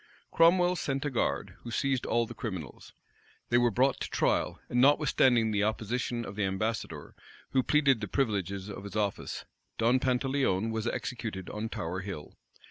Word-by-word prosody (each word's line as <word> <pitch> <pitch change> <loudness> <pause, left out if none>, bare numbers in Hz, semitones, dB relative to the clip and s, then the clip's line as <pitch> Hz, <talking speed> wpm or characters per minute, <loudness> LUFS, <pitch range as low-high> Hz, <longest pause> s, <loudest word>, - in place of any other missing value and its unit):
Cromwell 175 +2 +5
sent 140 -3 -2
a 145 - -1
guard, 120 - -1
who 120 - -9
seized 135 +1 0
all 120 0 +2
the - - -8
criminals. 95 - -6 0.6
They 120 - +4
were 120 0 +4
brought 130 +4 +2
to - - -3
trial; - - +1
and 125 - +1
notwithstanding 130 -5 +4
the 105 -1 +1
opposition 115 +2 -1
of 95 - -7
the 105 - -1
ambassador, 105 +4 -3 0.4
who 130 - +3
pleaded 140 -4 +3
the 105 - -2
privileges 100 -5 -1
of 100 -1 -7
his 100 - -8
office, 105 -2 -2 0.3
Don 120 +3 +3
Pantaleon 130 -5 +1
was 110 +1 -2
executed 115 -7 -4
on 105 +2 -4
Tower 90 -1 -3
Hill. 95 -6 -7
115 Hz, 165 wpm, -30 LUFS, 105-130 Hz, 0.6 s, Cromwell